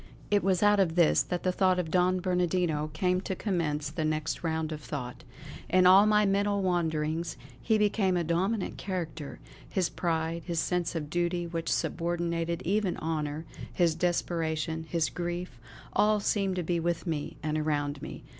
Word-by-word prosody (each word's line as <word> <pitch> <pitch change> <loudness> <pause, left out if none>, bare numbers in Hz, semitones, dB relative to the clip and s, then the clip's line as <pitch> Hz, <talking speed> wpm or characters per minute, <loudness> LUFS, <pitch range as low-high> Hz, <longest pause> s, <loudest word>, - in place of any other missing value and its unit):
It 205 -1 +3
was 190 0 +2
out 205 0 +5
of 170 -4 +2
this 170 -3 +5
that 180 -1 -3
the 185 - +2
thought 185 0 +2
of 170 -3 -2
Don 185 0 +2
Bernardino 175 -4 0
came 180 +4 +1
to 190 - -3
commence 155 -7 -1
the 160 +1 -2
next 155 +1 -1
round 160 -1 -1
of 155 -1 -5
thought. 125 -5 -6 0.5
In 185 0 +4
all 190 +3 +8
my 210 0 +4
mental 200 0 +1
wanderings 165 -2 -1 0.2
he 220 -2 +2
became 205 -3 +2
a 175 - +1
dominant 185 +6 -1
character; 165 -6 -5 0.3
his 185 -3 0
pride, 165 -1 -1
his 170 -2 -1
sense 180 0 -1
of 150 -2 -4
duty 175 0 0
which 165 -1 -3
subordinated 170 0 -1
even 195 +1 0
honour, 155 -1 -3 0.3
his 170 -3 +2
desperation, 160 -1 -1
his 165 -3 +1
grief, 175 -6 -4 0.3
all 210 0 +3
seemed 195 -2 0
to 180 - -1
be 170 +1 0
with 170 +1 -1
me 155 -4 -3
and 155 0 0
around 145 -2 -1
me. - - -8
170 Hz, 170 wpm, -29 LUFS, 160-185 Hz, 0.5 s, all